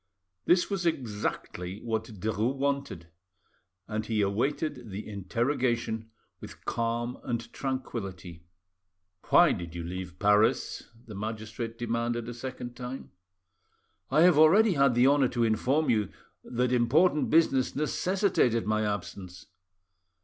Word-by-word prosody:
This 175 0 +4
was 190 -4 -1
exactly 105 - -3
what 110 -1 -2
Derues 110 +4 -2
wanted, 140 - -2 0.8
and 110 0 -2
he 110 -1 0
awaited 125 +5 -1
the 100 +2 -6
interrogation 115 +2 -1 0.3
with - - -12
calm 120 +1 -2
and 115 -1 -4
tranquillity. 95 -10 -5 0.9
"Why - - +6
did 85 -1 -5
you 85 - -4
leave 90 +1 -6
Paris?" 105 +2 +2 0.2
the 110 - -10
magistrate 110 +2 -5
demanded 120 0 -2
a 120 - -5
second 120 0 -7
time. 125 +2 -7 1.0
"I 150 +4 +3
have 175 -3 +6
already 195 +7 +6
had 140 -5 +3
the 120 +1 +5
honour 140 -1 +4
to 120 -1 0
inform 125 +7 +2
you 105 -4 +1 0.3
that 125 0 -1
important 145 +7 +3
business 145 -5 +3
necessitated 155 - +1
my 110 +1 +1
absence." 95 -3 -5
120 Hz, 120 wpm, -28 LUFS, 105-135 Hz, 1.0 s, Why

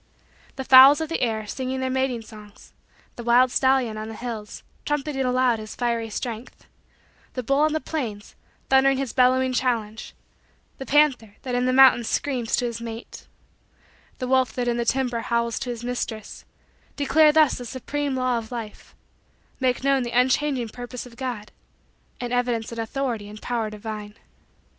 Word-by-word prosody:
The 265 - -4
fowls 265 +3 +8
of 320 -1 -3
the 330 - -2
air, 220 -3 -1
singing 260 +4 -4
their 260 0 -1
mating 260 -3 -1
songs; 210 -2 -15 0.4
the 240 - -6
wild 245 +2 +4
stallion 260 -5 +2
on 215 - -5
the 225 - -7
hills, 220 -3 -7 0.2
trumpeting 295 -2 -2
aloud 250 -2 +2
his 215 0 -8
fiery 235 -2 -1
strength; 230 +2 -6 0.7
the 255 - -4
bull 275 +4 +1
on 305 +1 +3
the 315 - 0
plains, 230 -11 -5 0.3
thundering 270 0 +4
his 265 -3 -3
bellowing 255 0 +3
challenge; 230 -4 -2 0.6
the 265 - -7
panther 265 -8 +2
that 255 -2 -4
in 245 +1 +1
the - - +2
mountains 255 -3 +6
screams 255 -5 -1
to 245 - -1
his 235 -1 -4
mate; 230 0 -8 0.9
the 255 - -4
wolf 260 -1 +2
that 245 -1 -2
in 240 0 0
the 235 - -1
timber 250 -1 0
howls 235 0 -1
to 255 - -5
his 240 -1 -5
mistress; 240 -3 -5 0.5
declare 300 +2 +4
thus 305 -3 +3
the 245 - -7
supreme 280 +3 -3
law 255 -2 0
of 220 +1 -11
Life 230 -3 -8 0.6
make 255 -1 0
known 275 -1 +3
the 240 0 -2
unchanging 260 -1 +1
purpose 245 +2 -8
of 240 -2 -14
God 240 -4 -5 0.7
and 245 0 -4
evidence 240 -2 -1
an 230 - -6
authority 225 -2 -3
and 210 +1 -10
power 230 -2 -2
divine. 210 -1 -7
245 Hz, 170 wpm, -24 LUFS, 230-265 Hz, 0.9 s, fowls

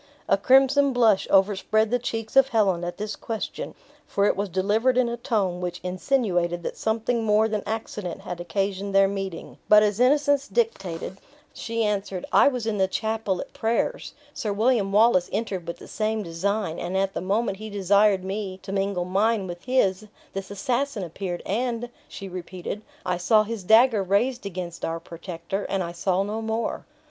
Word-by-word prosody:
A - - +5
crimson 270 +1 +4
blush 225 -5 +3
overspread 205 +3 +3
the 245 - +2
cheeks 225 -1 -4
of 270 -1 +7
Helen 200 -8 +1
at 175 0 -4
this 210 0 -4
question, 225 -2 -5 0.3
for 200 - +1
it - - +3
was 200 0 -2
delivered 210 +8 +1
in 255 -1 +3
a 235 - -2
tone 210 -8 -1
which 175 0 -4
insinuated 180 -3 0
that - - -4
something 225 +1 -1
more 215 0 +3
than 215 -2 -2
accident 210 -5 -4
had 175 -1 -6
occasioned 195 +2 -2
their 195 0 +6
meeting, 195 -3 -5
but 210 0 +8
as 210 0 0
innocence 285 +2 +3
dictated, 190 - -2 0.4
she 230 0 -2
answered, 200 -3 -2
"I - - +7
was 250 -5 0
in 215 -3 -1
the 190 - +3
chapel 220 -1 -1
at - - -10
prayers; 235 - -1 0.2
Sir 210 - -3
William 215 -1 +2
Wallace 205 -3 +4
entered 195 -5 -3
with 170 - -4
the - - -12
same 215 0 -1
design; 185 +1 -2
and 180 +2 -2
at 195 0 0
the - - -3
moment 195 +2 0
he 215 0 -7
desired 200 0 +3
me 190 -1 -4
to 195 - -6
mingle 195 -2 -1
mine 200 +3 +1
with 175 -1 -8
his, 215 -6 +1 0.3
this 195 0 -5
assassin 240 +3 -1
appeared 175 +1 -5
and 240 +3 -2 0.2
(she 195 - -8
repeated) 185 +2 -6 0.2
I 180 -1 0
saw 215 +4 +4
his 215 -2 -5
dagger 220 +2 +5
raised 205 +5 0
against 175 -2 -6
our 165 0 -2
protector, 170 +3 -6
and 195 -1 0
I 170 - -5
saw 185 +2 0
no 210 +2 -3
more." 225 +1 -3
205 Hz, 180 wpm, -25 LUFS, 185-225 Hz, 0.4 s, but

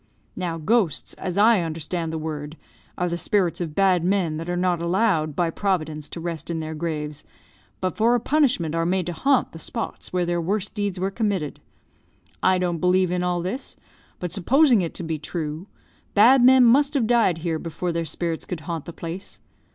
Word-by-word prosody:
Now, 175 -3 -3
ghosts, 190 0 +1
as 185 -1 -5
I 220 +1 +6
understand 165 +1 -3
the 160 - -3
word, 155 -1 -5 0.4
are 180 - 0
the 170 0 -2
spirits 185 -4 +1
of 160 -3 -4
bad 190 -3 +3
men 180 -4 +1
that 165 +2 -5
are 175 - -1
not 180 -2 +1
allowed 170 -4 +1
by 170 -2 +1
Providence 155 -6 -2
to - - -7
rest 165 -1 -5
in 165 -1 -2
their 160 0 -4
graves 150 -2 -4 0.6
but, 185 -1 -1
for 230 +3 +3
a - - +2
punishment, 250 - +1
are 165 0 +1
made 180 +1 0
to 175 - -3
haunt 270 - +2
the 165 - -10
spots 230 +7 -5
where 180 -1 0
their 175 0 0
worst 195 +4 -2
deeds 205 -3 -2
were 190 +2 -1
committed. 195 -9 -2 0.8
I 185 0 +4
don't 175 -2 -1
believe 180 0 +2
in 180 0 0
all 175 -1 -1
this; 200 +10 -5 0.4
but, 180 -2 -5
supposing 240 - +4
it 170 - -4
to - - -4
be 160 -2 -3
true, 155 +2 -5 0.5
bad 240 +5 +7
men 260 0 +7
must 280 +5 +4
have 255 -5 +2
died 225 -7 +3
here 165 -1 -2
before 170 +2 -3
their 165 0 -1
spirits 165 +1 -3
could 175 -4 -5
haunt 165 0 -5
the 170 - -8
place. 170 +4 -7
175 Hz, 195 wpm, -24 LUFS, 165-200 Hz, 0.8 s, bad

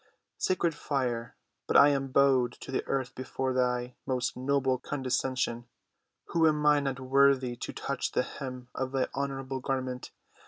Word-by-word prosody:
Sacred 175 -3 +1
fire, 125 -6 -2 0.3
but - - +4
I 145 - +8
am 135 -1 0
bowed 130 -2 +3
to - - -7
the 130 - 0
earth 130 -2 -1
before 130 0 -3
thy 125 -1 0
most 125 -2 -1
noble 130 0 +1
condescension, 130 -3 -2 0.6
who 165 -1 +4
am 150 -1 +1
not 145 -3 +3
worthy 130 -1 +3
to - - -5
touch 140 -2 -3
the - - +2
hem 125 -2 -7
of 130 0 -3
thy 135 -1 +1
honorable 135 -1 -3
garment. 130 -1 -3
130 Hz, 150 wpm, -29 LUFS, 125-140 Hz, 0.6 s, I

